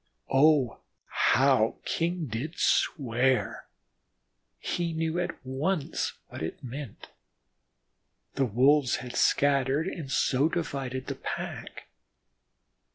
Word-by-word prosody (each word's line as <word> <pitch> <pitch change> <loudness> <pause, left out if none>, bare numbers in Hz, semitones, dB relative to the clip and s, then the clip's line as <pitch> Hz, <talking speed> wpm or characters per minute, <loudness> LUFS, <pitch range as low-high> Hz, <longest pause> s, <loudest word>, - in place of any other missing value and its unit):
Oh, 135 -4 +4 0.3
how 130 -5 +3
King 170 0 -1
did 135 +8 -5
swear! 130 -2 +1 0.9
He 170 - -2
knew 160 +1 -1
at 175 - -2
once 145 +5 -1 0.2
what - - -8
it 80 - -5
meant. 130 -1 -8 1.2
The 135 - +1
Wolves 130 +4 +3
had 125 - -7
scattered, 140 +1 +2
and 155 -8 -5
so 135 0 +2
had 165 - 0
divided 135 -6 -3
the - - -3
pack. - - -6
140 Hz, 100 wpm, -28 LUFS, 130-160 Hz, 1.2 s, Oh